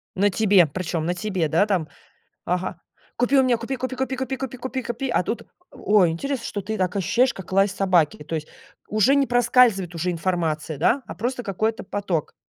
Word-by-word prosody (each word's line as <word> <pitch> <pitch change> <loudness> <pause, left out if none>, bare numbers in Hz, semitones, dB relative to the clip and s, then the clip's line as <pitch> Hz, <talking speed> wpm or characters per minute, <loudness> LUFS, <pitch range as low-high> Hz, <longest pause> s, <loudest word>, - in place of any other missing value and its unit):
На 200 +2 +3
тебе, 200 -3 +4
причем 165 0 -3
на 175 - 0
тебе, 185 -3 -1
да, 165 +7 +3
там. 185 -7 0 0.6
Ага, 180 -1 -2 0.4
купи 245 +3 +3
у 265 - +6
меня, 250 -2 +2
купи 235 +4 -4
купи 255 0 -4
купи, 265 +1 -2
купи 265 +1 -3
купи 260 -1 -5
купи 260 +1 -4
купи, 240 +3 -3
а 210 - +2
тут 225 - -3 0.3
О 210 0 +2
ой, 175 -3 +4
интересно, 255 +8 -3
что 205 - -4
ты 215 +3 -4
так 185 0 -1
ощущаешь, 235 +7 +2
как 190 -2 -10
лай 195 +1 +4
собаки. 180 -7 +1
То 165 +2 -4
есть 155 -1 -4 0.4
уже 215 +6 +3
не 280 -1 +3
проскальзывает 235 -7 +3
уже 180 +2 -1
информация, 165 -3 -2
да, 235 - +2
а - - -7
просто 245 +3 -3
какой-то 220 +2 -1
поток. 190 -6 -3
200 Hz, 200 wpm, -23 LUFS, 175-245 Hz, 0.6 s, у